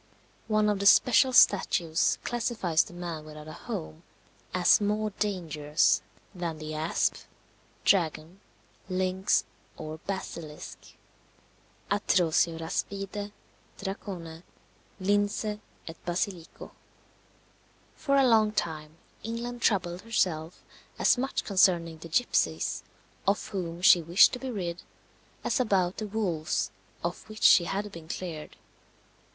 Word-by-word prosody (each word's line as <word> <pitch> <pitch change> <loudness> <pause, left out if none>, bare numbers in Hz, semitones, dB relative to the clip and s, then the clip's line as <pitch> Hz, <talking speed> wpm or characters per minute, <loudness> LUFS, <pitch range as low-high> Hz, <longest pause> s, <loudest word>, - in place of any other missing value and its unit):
One 215 -1 +2
of 205 -2 +1
the 200 - +2
special 255 +4 +6
statutes 175 -8 +4
classifies 220 -9 0
the - - -6
man 170 -3 -5
without 155 0 -11
a 155 - -8
home 80 0 -6 0.5
as 185 +3 +4
"more 210 +1 0
dangerous 155 -7 +1 0.3
than 170 -4 -4
the 155 0 -6
asp, 155 +2 0 0.7
dragon, 170 0 +1 0.5
lynx, 185 +1 +1 0.3
or 155 0 -7
basilisk" 170 -6 -6 1.1
(atrocior 175 -4 +2
aspide, 200 +4 -4 0.5
dracone, 185 -5 -6 0.6
lynce, 205 +2 +1
et 210 -5 -7
basilico). 175 -1 -4 1.2
For 275 -2 0
a 270 -1 +5
long 220 -2 +4
time 155 -4 -3 0.2
England 235 +2 -5
troubled 180 -5 +1
herself 175 -7 -1 0.3
as - - +4
much 265 +2 -2
concerning 175 -4 +2
the 165 - -10
gipsies, 85 - +1 0.5
of 200 +1 +1
whom 175 -3 -5
she 175 - +7
wished 170 +4 +5
to 250 - -4
be 265 - -5
rid 180 -7 -4 0.6
as - - 0
about 195 -7 +1
the 215 - -4
wolves 170 - -1 0.3
of 175 +5 -4
which 215 0 -8
she 170 - +7
had 205 +3 -3
been 165 -4 -11
cleared. 160 -3 -6
185 Hz, 115 wpm, -28 LUFS, 165-210 Hz, 1.2 s, she